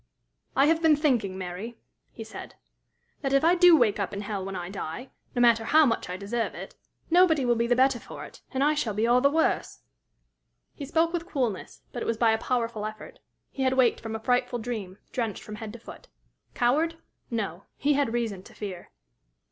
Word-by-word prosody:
"I 275 - +5
have 325 +2 +3
been 320 -2 +5
thinking, 240 - +1
Mary," 190 +6 -6 0.3
he 225 - -8
said, 220 - -10 0.7
"that 275 -1 -1
if 275 +2 +4
I 335 +2 +5
do 355 -2 +7
wake 215 -6 +2
up 200 0 -2
in 200 - -4
hell 205 -2 -4
when 195 0 -5
I 175 -1 -4
die, 195 +6 -6 0.2
no 245 - +2
matter 230 -1 +5
how 310 +6 +5
much 230 -7 -1
I 180 - -4
deserve 225 +4 -2
it, - - -8 0.4
nobody 330 -6 +5
will 240 - +4
be 235 0 0
the 245 - +3
better 260 0 +3
for - - -9
it, - - -14
and 265 +1 0
I 300 +1 +4
shall 235 -9 -2
be 215 +2 +1
all 245 +2 +4
the 280 - +5
worse." 320 +2 0 0.9
He 285 - -7
spoke 330 +3 +1
with 340 0 -3
coolness, 250 - -3
but 240 - -4
it - - -3
was 230 - 0
by 230 -1 +4
a 220 - +1
powerful 230 -4 -1
effort: 215 - -10 0.3
he 270 - -6
had 260 -1 +2
waked 260 -2 +3
from 225 -1 -5
a - - -3
frightful 245 +1 +1
dream, 215 -5 -5
drenched 230 -5 -3
from 210 0 -8
head 220 -1 -7
to 235 - -9
foot. - - -12 0.5
Coward? 305 +7 +2 0.3
No. 200 -6 -3
He 290 +2 +2
had 280 -4 +1
reason 225 -5 -2
to - - -16
fear. 190 -4 -7
240 Hz, 210 wpm, -27 LUFS, 215-280 Hz, 0.9 s, do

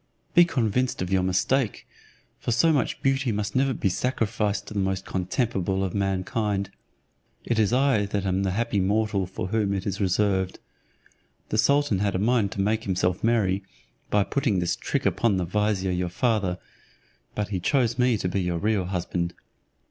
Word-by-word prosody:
Be 175 - +7
convinced 125 - 0
of 90 - -5
your 95 -1 +3
mistake, 100 +6 0 0.5
for - - -2
so 160 +8 +4
much 140 - -1
beauty 135 -2 +1
must 105 +2 -3
never 135 +1 +3
be 110 - -1
sacrificed 105 -2 -1
to - - -9
the 105 - -1
most 95 0 -1
contemptible 95 0 -1
of 95 - -2
mankind. 100 0 -1 0.7
It 115 -2 0
is 105 -1 +3
I 130 -5 +2
that 100 -1 -2
am 95 0 +1
the 95 - 0
happy 110 +2 0
mortal 100 0 +1
for 95 0 -5
whom 105 -2 0
it 95 - -4
is 100 0 -3
reserved. 95 0 +1 0.9
The 110 - 0
sultan 140 -6 +3
had 100 -1 0
a - - +2
mind 110 0 +2
to 95 - -2
make 110 +3 0
himself 90 -2 0
merry, 105 -5 +2 0.5
by 105 -1 +3
putting 120 -3 0
this 85 -1 0
trick - - -2
upon 115 -5 +2
the 90 - 0
vizier 100 0 0
your 90 0 -1
father, 100 -3 0 0.8
but 105 -1 -2
he 95 -3 -2
chose 120 - +1
me 125 -2 +3
to 95 - -2
be 95 +2 -1
your 90 -1 -1
real 105 +1 0
husband. 90 -1 -2
100 Hz, 180 wpm, -25 LUFS, 95-115 Hz, 0.9 s, Be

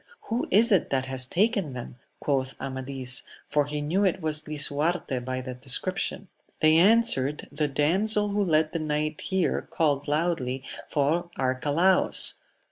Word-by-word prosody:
Who 235 +2 0
is 225 +5 +4
it 190 -5 +3
that 130 -1 0
has 130 -1 -3
taken 200 - +1
them? 125 0 -8 0.2
quoth 135 -2 -2
Amadis; 130 -1 -1 0.3
for 150 -1 +1
he 150 0 -3
knew 170 +7 0
it 190 -3 +1
was 155 -2 -2
Lisuarte 150 -1 -1
by 130 0 -3
the 130 0 -6
description. 180 +10 -2 0.3
They 155 0 +5
answered. 175 - +3
The 150 +1 -1
damsel 195 +9 +1
who 205 0 0
led 155 -3 +2
the 165 - -1
knight 155 0 -2
here 190 -2 -1
called 145 -3 0
loudly 145 -4 -1 0.3
for 160 +4 0
Arcalaus. 145 +8 +3
150 Hz, 145 wpm, -26 LUFS, 135-180 Hz, 0.3 s, They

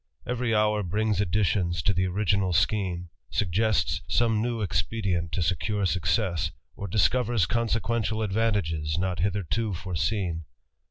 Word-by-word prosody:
Every 125 -2 0
hour 105 0 +2
brings 105 +2 0
additions 90 -2 +1
to 100 - +2
the 95 0 +1
original 95 -1 +1
sch 90 +5 +3 0.6
suggests 100 -5 +1
some 115 -2 +2
new 120 0 -1
expedient 95 -4 -1
to 90 - +1
secure 95 +4 0
success, 85 0 +1 0.3
or 100 - -5
disc 100 +1 +3
consequential 115 -1 0
advantages 95 -8 0
not 90 -1 -1
hitherto 100 +2 -1
foreseen. 85 -1 -2
100 Hz, 120 wpm, -27 LUFS, 85-110 Hz, 0.6 s, sch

